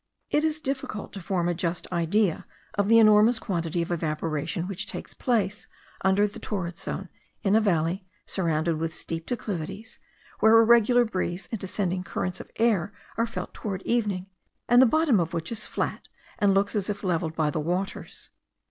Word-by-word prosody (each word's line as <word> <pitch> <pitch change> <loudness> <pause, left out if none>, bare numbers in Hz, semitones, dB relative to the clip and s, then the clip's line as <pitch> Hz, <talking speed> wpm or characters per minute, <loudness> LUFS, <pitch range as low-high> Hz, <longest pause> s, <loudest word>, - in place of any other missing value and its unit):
It 300 - +3
is 310 -1 +1
difficult 265 -7 -4
to 195 - -6
form 175 -1 0
a 175 - +1
just 170 0 -2
idea 175 +2 +1 0.3
of 200 -1 +1
the 230 +1 +6
enormous 215 +1 +6
quantity 170 -5 -1
of 170 - -6
evaporation 160 +1 -2
which 195 -2 -3
takes - - -5
place 215 -5 -1 0.4
under 190 +2 +4
the 205 - -10
torrid 180 -4 -4
zone, - - -4 0.4
in 200 +1 +3
a 220 - +5
valley 180 -1 0 0.2
surrounded 165 -3 0
with 160 0 -3
steep 165 0 -5
declivities, 215 -2 -5 0.4
where 220 +1 +7
a 225 - +7
regular 235 +1 +5
breeze 185 -3 -3
and 225 - -3
descending 185 -1 -2
currents 180 0 -3
of - - -9
air 210 -5 +2 0.2
are 230 +1 +1
felt 230 - -6
towards 195 -3 -5
evening, 210 -6 0 0.4
and 245 +1 +7
the 260 - +7
bottom 310 - +3
of 170 0 -1
which 165 +4 -3
is 220 -2 -3
flat, - - -3 0.3
and 200 -2 +4
looks 200 +3 +1
as 205 -1 0
if 205 0 -3
levelled 165 -3 -1
by 155 -2 +1
the 155 - -2
waters. 180 +5 -3
195 Hz, 180 wpm, -26 LUFS, 170-220 Hz, 0.4 s, where